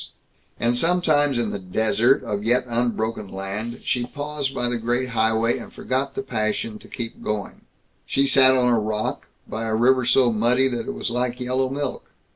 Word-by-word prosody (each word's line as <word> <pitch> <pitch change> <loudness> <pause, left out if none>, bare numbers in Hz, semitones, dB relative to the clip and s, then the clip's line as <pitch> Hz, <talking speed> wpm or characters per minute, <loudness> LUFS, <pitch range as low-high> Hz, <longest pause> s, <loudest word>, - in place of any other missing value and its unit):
And 120 +1 +1
sometimes 150 -3 +2
in 115 -3 0
the 100 - -4
"desert" 110 +7 +2
of 105 -1 -3
yet 120 +3 +2
unbroken 115 -3 -1
land 100 +5 -5
she 125 - 0
paused 145 0 -4
by 120 -2 -2
the 120 -1 -1
Great 120 +3 -1
Highway 110 0 +1
and - - -10
forgot 130 +2 -2
the 205 - -3
passion 110 - -2
to - - -14
keep 115 -2 -7
going 105 -2 -4 0.5
She 135 - +2
sat 130 -1 +6
on 125 -1 +3
a 115 - +3
rock, 105 0 -3 0.2
by 110 +1 -4
a 110 - 0
river 125 +2 +3
so 125 0 +4
muddy 120 +4 +3
that 120 +5 -4
it 205 - -4
was 210 - -3
like 125 0 -1
yellow 130 +1 0
milk. 140 0 -4
120 Hz, 185 wpm, -23 LUFS, 110-130 Hz, 0.5 s, sat